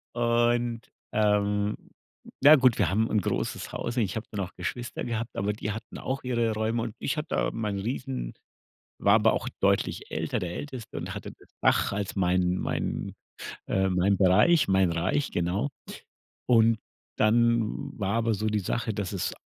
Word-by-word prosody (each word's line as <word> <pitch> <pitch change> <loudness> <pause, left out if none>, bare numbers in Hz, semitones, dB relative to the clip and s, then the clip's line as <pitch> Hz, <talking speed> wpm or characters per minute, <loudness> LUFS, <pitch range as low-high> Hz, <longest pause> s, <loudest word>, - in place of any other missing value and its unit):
Und, 120 0 +1 0.3
ähm, 105 -1 +2 0.7
na 145 +3 +8
ja, - - +11
gut, 130 -5 +4
wir 95 -6 +3
haben 110 +4 +1
'n 105 - +2
großes - - -3
Haus 120 +1 -4
und 120 - +3
ich 95 - -3
habe 110 0 -4
dann 105 - -4
auch 90 - -14
Geschwister 120 0 -4
gehabt, 115 0 -3
aber 100 +2 0
die 105 0 -4
hatten 110 +2 -7
auch 135 +1 -3
ihre 120 -3 0
Räume. 110 +2 -1
Und 115 -1 -5
ich 135 - -2
hatte 150 - -3
da - - +1
meinen 105 -3 -2
riesen 125 - -4 0.7
war - - +5
aber - - +4
auch - - -2
deutlich - - 0
älter, - - -1
der 90 -1 -4
Älteste 130 -3 -7
und 85 +3 -4
hatte 100 -2 -7
das - - -21
Dach - - +3
als 100 -1 -3
meinen 90 -1 +2
meinen, - - -3 0.5
äh 95 0 +1
meinen 95 +2 +2
Bereich, 105 - +5
mein 95 -2 +3
Reich, 90 - 0
genau. 90 +9 -1 0.8
Und 115 -2 +4 0.4
dann 115 0 +2
war 100 0 -1
aber 115 0 +1
so 105 +2 -2
die 105 -1 +1
Sache, 110 +3 -2
dass 100 -3 -3
es - - -2
110 Hz, 180 wpm, -27 LUFS, 95-120 Hz, 0.8 s, ja